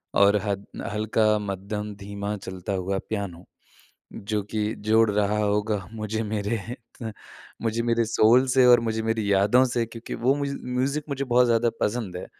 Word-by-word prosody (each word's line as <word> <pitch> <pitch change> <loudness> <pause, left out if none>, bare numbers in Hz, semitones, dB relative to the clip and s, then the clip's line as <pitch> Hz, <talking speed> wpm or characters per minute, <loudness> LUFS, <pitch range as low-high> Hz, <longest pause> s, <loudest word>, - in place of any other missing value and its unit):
और 100 +1 +5
हद 100 -1 -2 0.3
हल्का, 110 0 +2
मध्यम, 105 +1 -4
धीमा 100 +1 -5
चलता 95 0 -6
हुआ 95 +1 -1
पियानो, 95 -5 -4 0.7
जो 105 +1 -2
कि 105 0 -1
जोड़ 110 +1 +3
रहा 105 +1 +1
होगा 105 -1 0
मुझे 110 0 -3
मेरे 105 +1 -2 1.0
मुझे 115 0 0
मेरे 115 -1 +2
सोल 115 +3 +4
से 130 0 +4
और 120 -1 +8
मुझे 110 -1 -1
मेरी 110 -2 0
यादों 105 +6 +4
से 120 -2 0
क्योंकि 115 +1 -8
वो 130 +4 +2
म्यूज़ 140 -1 -3
म्यूज़िक 130 +4 -1
मुझे 140 -1 -2
बहुत 125 0 +4
ज़्यादा 115 0 +3
पसंद 105 -5 -1
है, - - -6
110 Hz, 160 wpm, -25 LUFS, 100-115 Hz, 1.0 s, और